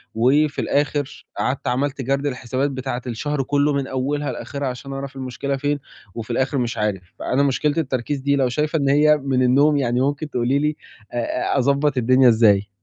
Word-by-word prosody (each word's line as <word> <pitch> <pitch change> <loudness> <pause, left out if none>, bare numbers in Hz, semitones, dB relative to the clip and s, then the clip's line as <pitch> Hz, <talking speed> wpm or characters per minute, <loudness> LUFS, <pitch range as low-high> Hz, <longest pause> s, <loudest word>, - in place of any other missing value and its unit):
وفي 140 +6 +2
الآخر 145 -1 -1
قعدت 130 +1 -1
عملت 135 +2 -1
جَرد 140 +2 0
للحسابات 130 +1 -2
بتاعة 130 -2 -4
الشهر 135 +4 -2
كلّه 145 +2 +1
من 140 -1 -1
أولها 140 +3 -2
لآخِرها 140 -1 -5
عشان 130 +2 -6
أعرف 135 0 -6
المشكلة 135 +1 -3
فين 145 +1 -1 0.4
وفي 115 0 -5
الآخِر 130 +4 0
مش 120 -2 -1
عارف، 105 -3 -1 0.2
فأنا 135 +2 +1
مشكلة 145 +2 +1
التركيز 135 -2 -1
دي 140 +1 +1
لو 135 -2 +2
شايفة 150 +5 0
إن 140 -1 +1
هي 150 +2 +5
من 135 -2 0
النوم 140 +4 +4
يعني 125 -2 +1
ممكن 145 +3 -1
تقولي 125 +1 +1
لي 150 +1 0 0.4
أ 120 +1 -1
أ - - +2
أضبّط 140 +1 +2
الدنيا 130 +1 +5
إزاي؟ 105 -3 +4
135 Hz, 180 wpm, -21 LUFS, 125-145 Hz, 0.4 s, هي